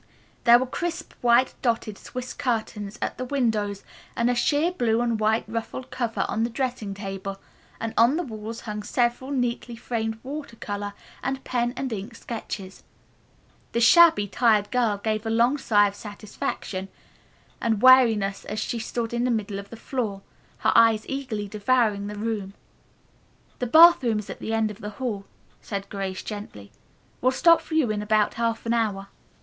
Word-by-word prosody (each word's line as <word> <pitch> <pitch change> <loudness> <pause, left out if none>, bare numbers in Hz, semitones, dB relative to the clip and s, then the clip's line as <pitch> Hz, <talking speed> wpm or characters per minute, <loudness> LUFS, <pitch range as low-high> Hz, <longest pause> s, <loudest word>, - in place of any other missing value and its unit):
There 235 0 +9
were 255 - 0
crisp, 340 +6 -4
white 245 +1 +4
dotted 230 -4 0
swiss 255 +4 -7
curtains 220 -4 -3
at - - -4
the - - -1
windows 220 -7 -1 0.3
and 235 +1 +2
a - - +2
sheer 290 +7 +2
blue 235 -10 +1
and 235 -2 0
white 220 +1 +2
ruffled 230 +3 -5
cover 240 -3 -1
on 225 -1 -1
the 235 - 0
dressing 240 -5 -3
table, 195 -1 -6 0.4
while 225 -1 -3
on 240 +6 +5
the 350 - -1
walls 225 -3 -7
hung 210 -1 -5
several 240 +4 0
neatly 245 -3 -2
framed 225 -1 -3
water 280 -2 -6
color 205 -2 -5 0.3
and 270 0 -3
pen 240 -1 0
and 265 -3 -2
ink 215 +3 -6
sketches. 205 -5 -7 0.9
The 235 - +1
shabby, 280 -3 +6
tired 215 -1 +2
girl 235 -5 +2
gave 215 +1 -2
a 225 - -3
long 235 +5 +3
sigh 205 -5 +4
of 200 - -5
satisfaction 200 -2 -5 0.7
and 225 -2 0
weariness 225 -7 +5
as 210 - -5
she 230 +2 -2
stood 230 +1 -3
in 240 0 0
the 250 - +1
middle 210 -4 -1
of 200 - -10
the 230 - -9
floor, 220 -6 -3 0.3
her - - +2
eyes 225 -2 +5
eagerly 255 -7 -3
devouring 210 -1 +1
the 210 - -6
pretty 210 +2 -3
room. 205 -4 -3 1.1
"The 250 - -1
bathroom 315 -6 +7
is 210 - -5
at - - -9
the - - -4
end 225 -1 +1
of 210 +2 -12
the 210 - -5
hall," 215 -6 -3 0.4
said 200 -1 -5
Grace 195 -2 -4
gently. 205 - -8 0.5
"We'll 255 - +3
stop 335 +3 +5
for 320 - -6
you 285 -9 +3
in 210 -1 -2
about 210 0 +2
half 230 0 -1
an 230 - +1
hour." 205 -4 -1
225 Hz, 175 wpm, -25 LUFS, 210-245 Hz, 1.1 s, There